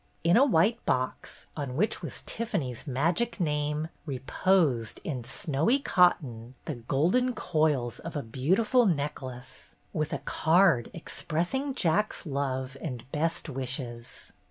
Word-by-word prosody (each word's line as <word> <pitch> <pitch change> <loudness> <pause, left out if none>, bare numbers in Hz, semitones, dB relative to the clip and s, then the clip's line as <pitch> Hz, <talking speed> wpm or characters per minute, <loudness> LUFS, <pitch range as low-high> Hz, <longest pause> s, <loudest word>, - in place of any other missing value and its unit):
In 170 +2 +5
a 255 - +7
white 220 - +3
box, 130 0 -2
on 140 -4 -4
which 210 +9 +1
was - - -6
Tiffany's 150 - -3
magic 170 - 0
name, 150 -1 0 0.2
reposed, 135 - +1
in 130 -6 -3
snowy 145 - +1
cotton, 130 - +2
the 155 - -2
golden 165 - +1
coils 150 -8 0
of 165 - -7
a 145 - -2
beautiful 190 - +2
neck 145 -5 -1
lace, 130 0 -9 0.2
with 155 -1 -1
a - - 0
card 165 -7 +3
expressing 175 - -2
Jack's 195 +1 +1
love 135 -2 -2
and 125 -7 -5
best 165 +3 -1
wishes 125 -3 -5
150 Hz, 130 wpm, -28 LUFS, 130-180 Hz, 0.2 s, a